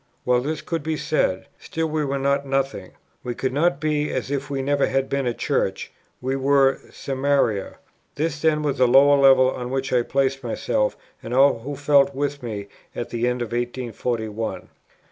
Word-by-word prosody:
Well, 125 0 +3
this 155 +4 -3
could 165 -2 -3
be 155 +1 -2
said; 95 -13 0
still 165 0 -3
we 155 -1 -1
were 140 -1 -1
not 140 +1 +1
nothing: 135 0 -2 0.3
we 120 -1 -4
could 130 -1 -2
not 150 0 +2
be 150 -1 0
as 130 +1 -3
if 140 0 -2
we 135 -1 -2
never 140 +1 +2
had 135 0 0
been 140 -2 -1
a 120 - 0
Church; - - -1 0.3
we 130 +1 -1
were 135 0 +3
"Samaria." 135 -7 -1 0.4
This 150 0 -2
then 155 -1 +2
was 145 -2 -1
that 125 - +5
lower 140 +3 +6
level 130 -1 +6
on 125 -1 -5
which 135 0 -2
I 125 - +4
placed 135 +2 0
myself, - - -1 0.2
and 120 - -4
all 135 -2 +5
who 140 +5 -6
felt 140 -1 +3
with 145 0 -2
me, 105 -4 -5 0.3
at 120 - -5
the 120 +1 0
end 125 0 -1
of 115 - -6
1841. 120 -2 -3
Matt. - - -9
xxiv. - - -23
135 Hz, 195 wpm, -23 LUFS, 125-145 Hz, 0.4 s, lower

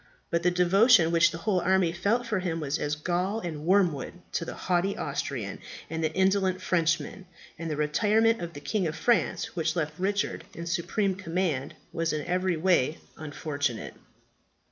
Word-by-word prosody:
But 170 - +1
the 180 - +3
devotion 180 +1 +5
which 170 0 +5
the 165 - -6
whole 190 +2 +1
army 185 -1 +2
felt 205 +8 0
for 215 -4 -1
him 170 -3 -2
was 150 0 -2
as 150 0 -1
gall 180 +7 -1
and 160 -5 -6
wormwood 180 -8 +2 0.2
to - - -1
the - - -6
haughty 180 +2 0
Austrian - - -3 0.3
and 160 0 -2
the 155 - +1
indolent 190 0 +2
Frenchman; 170 +1 0 0.3
and 165 -1 -4
the 155 - -1
retirement 215 +9 +2
of 170 -1 -5
the 145 - -9
King 180 +5 -1
of 155 - -4
France, 235 +4 +1
which 165 0 0
left 155 -3 -1
Richard 200 +2 -1
in 170 - -6
supreme 180 +4 0
command, 170 -6 -2 0.2
was 165 -1 0
in 150 -1 -3
every 180 0 0
way 160 -3 +2 0.2
unfortunate." 145 -5 -3
175 Hz, 170 wpm, -28 LUFS, 160-190 Hz, 0.3 s, devotion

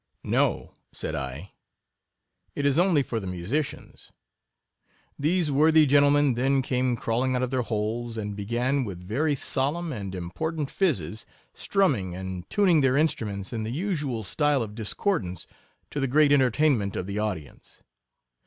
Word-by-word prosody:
No, - - 0 0.2
said - - -5
I, 70 +7 -5 1.0
it 145 - -2
is 140 +2 +3
only 175 -6 +4
for 115 -3 -3
the 95 - -6
musicians. 95 - -4 1.1
These 160 +1 +1
worthy 155 +2 +5
gentlemen 145 0 +4
then 135 +3 +1
came 125 -1 0
crawling 125 +3 0
out 125 - 0
of 130 - -2
their 130 -1 +1
holes, 115 +1 -3
and 105 -2 -4
began, 120 +7 0
with 95 -6 -7
very 145 +8 +1
solemn 145 +5 -2
and 100 -5 -5
important 145 - -3
phizzes, 110 - -1 0.3
strumming 130 - 0
and 95 -1 -6
tuning 185 -7 +4
their 135 0 +3
instruments 105 -11 -1
in 115 - -2
the 110 - -3
usual 145 - -2
style 145 - +1
of 105 -2 -7
discordance, 105 - -2 0.5
to 145 - -3
the 135 - +1
great 145 +3 +4
c - - +7
22 135 -2 +4
entertainment 125 -6 +1
of 90 - -3
the 100 +2 -3
audience. 95 -9 -6
125 Hz, 155 wpm, -26 LUFS, 105-145 Hz, 1.1 s, c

